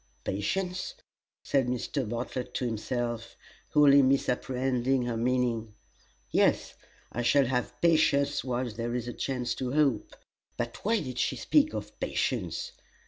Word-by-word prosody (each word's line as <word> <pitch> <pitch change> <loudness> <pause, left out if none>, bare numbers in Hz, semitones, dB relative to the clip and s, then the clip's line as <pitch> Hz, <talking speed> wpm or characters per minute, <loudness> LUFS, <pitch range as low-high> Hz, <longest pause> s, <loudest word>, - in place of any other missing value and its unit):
"Patience?" 180 - -2 0.5
said 135 -3 +1
Mr. 125 0 -2
Bartlett 125 +1 -4
to 125 - -1
himself, 120 0 -3 0.3
wholly 140 -1 +6
misapprehending 130 -1 +1
her 120 -1 -2
meaning; 115 -2 0 0.6
"yes, - - +2 0.4
I 120 - -2
shall 135 +3 +4
have 125 0 -2
patience 145 -4 +3
while 125 -1 -2
there 120 +2 -3
is 120 -1 -3
a 120 - -4
chance 125 -3 -2
to 125 0 -2
hope. 140 -8 +1 0.4
But 120 -1 -3
why 220 +1 +2
did 130 -4 -5
she - - +1
speak 305 0 +2
of - - -7
patience? 485 - -2
125 Hz, 135 wpm, -29 LUFS, 120-140 Hz, 0.6 s, wholly